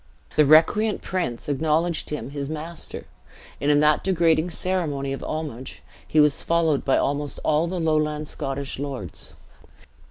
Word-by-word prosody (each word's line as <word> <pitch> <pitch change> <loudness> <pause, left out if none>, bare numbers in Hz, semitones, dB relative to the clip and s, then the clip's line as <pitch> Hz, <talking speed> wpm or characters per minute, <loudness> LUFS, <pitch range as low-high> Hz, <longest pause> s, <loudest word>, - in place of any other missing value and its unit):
The 150 -1 +5
recreant 205 +8 +4
prince 175 -11 -3
acknowledged 160 +4 0
him 150 -3 -5
his 140 -1 -4
master; 160 +2 -5 0.6
and 145 - +1
in 145 0 +5
that 150 0 +3
degrading 170 -3 +2
ceremony 155 -6 -2
of 135 - -6
homage, 145 -5 -5 0.2
he 155 - +2
was 150 -1 +4
followed 165 -4 +1
by 135 - +3
almost 145 0 -1
all 155 +2 +2
the 180 +1 -3
lowland 155 -2 0
Scottish 135 -1 -4
lords. 135 - -6
150 Hz, 140 wpm, -24 LUFS, 140-165 Hz, 0.6 s, The